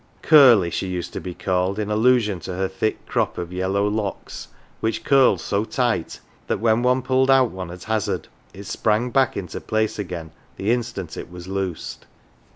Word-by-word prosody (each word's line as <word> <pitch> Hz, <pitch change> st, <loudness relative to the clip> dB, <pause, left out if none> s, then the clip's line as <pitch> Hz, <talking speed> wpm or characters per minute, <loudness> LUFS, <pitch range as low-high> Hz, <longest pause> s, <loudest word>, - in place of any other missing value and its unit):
"Curly,'" 120 Hz, -, +7 dB
she 95 Hz, -, -2 dB
used 90 Hz, -2 st, -4 dB
to -, -, -5 dB
be 90 Hz, -2 st, -6 dB
called, 95 Hz, +1 st, -1 dB
in 105 Hz, -1 st, -2 dB
allusion 110 Hz, -3 st, +3 dB
to 90 Hz, +2 st, -6 dB
her 95 Hz, +1 st, 0 dB
thick 95 Hz, +3 st, -3 dB
crop -, -, -1 dB
of 90 Hz, 0 st, -5 dB
yellow 95 Hz, +2 st, 0 dB
locks, 105 Hz, -1 st, -4 dB, 0.3 s
which 110 Hz, 0 st, -2 dB
curled 135 Hz, -2 st, +4 dB
so 100 Hz, +1 st, -1 dB
tight 115 Hz, -7 st, -1 dB, 0.3 s
that -, -, -1 dB
when 110 Hz, +1 st, +2 dB
one 125 Hz, +1 st, +2 dB
pulled 130 Hz, +1 st, +2 dB
out 130 Hz, -3 st, +5 dB
one 95 Hz, -1 st, -6 dB
at 90 Hz, +1 st, -9 dB
hazard 110 Hz, -1 st, -2 dB, 0.2 s
it 100 Hz, -, -10 dB
sprang 110 Hz, +5 st, 0 dB
back 135 Hz, -1 st, +2 dB
into 90 Hz, -4 st, -5 dB
place 110 Hz, 0 st, -1 dB
again 85 Hz, -5 st, -5 dB, 0.3 s
the 100 Hz, +4 st, 0 dB
instant 110 Hz, -8 st, -3 dB
it -, -, -7 dB
was 90 Hz, 0 st, -10 dB
loosed. 95 Hz, -3 st, -4 dB
105 Hz, 180 wpm, -22 LUFS, 90-120 Hz, 0.3 s, Curly